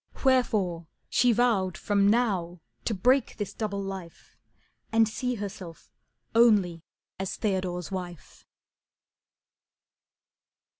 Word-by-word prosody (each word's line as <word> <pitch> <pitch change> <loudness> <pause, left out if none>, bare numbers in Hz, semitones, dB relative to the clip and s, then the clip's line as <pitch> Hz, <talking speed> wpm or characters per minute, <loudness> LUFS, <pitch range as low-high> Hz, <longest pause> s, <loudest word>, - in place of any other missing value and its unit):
Wherefore 205 -10 +2 0.2
She 245 - +4
vowed 215 -6 +1
from 200 -1 +2
now 195 -7 +1 0.3
to 220 - 0
break 255 +8 +2
this 205 -3 -4
double 200 -3 -3
life 190 -4 -8 0.6
And 225 0 +4
see 250 +3 -2
herself 190 -5 -8 0.4
only 205 -8 +4 0.4
as 190 -1 -3
Theodore's 185 -3 -2
wife. 180 -3 -8
200 Hz, 95 wpm, -27 LUFS, 180-225 Hz, 0.6 s, She